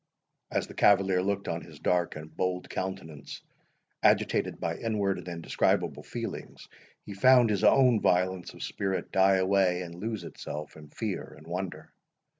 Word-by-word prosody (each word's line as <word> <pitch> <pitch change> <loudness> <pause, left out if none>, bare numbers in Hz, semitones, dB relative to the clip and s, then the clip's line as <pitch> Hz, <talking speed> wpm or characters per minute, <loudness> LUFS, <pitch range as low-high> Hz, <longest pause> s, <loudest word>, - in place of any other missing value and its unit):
As - - -1
the - - -12
cavalier 95 -2 +4
looked 100 +1 -2
on 85 0 -2
his 80 -2 -13
dark 90 -1 +1
and 75 0 -10
bold 90 -1 -2
countenance, 90 -6 -6 0.6
agitated - - +2
by - - -2
inward 100 -4 -1
and 90 - -11
indescribable 85 -2 0
feelings, - - -7 0.4
he 100 - -7
found 120 +3 +5
his 100 - 0
own 125 -5 +5
violence 90 0 +1
of - - -8
spirit 95 -1 -3
die 95 0 +4
away 95 -1 +2
and 85 -1 -8
lose 105 +2 -4
itself 75 -2 -7
in 75 -1 -13
fear 105 +3 -5
and 75 - -15
wonder. 90 +2 -5
95 Hz, 155 wpm, -29 LUFS, 85-100 Hz, 0.6 s, found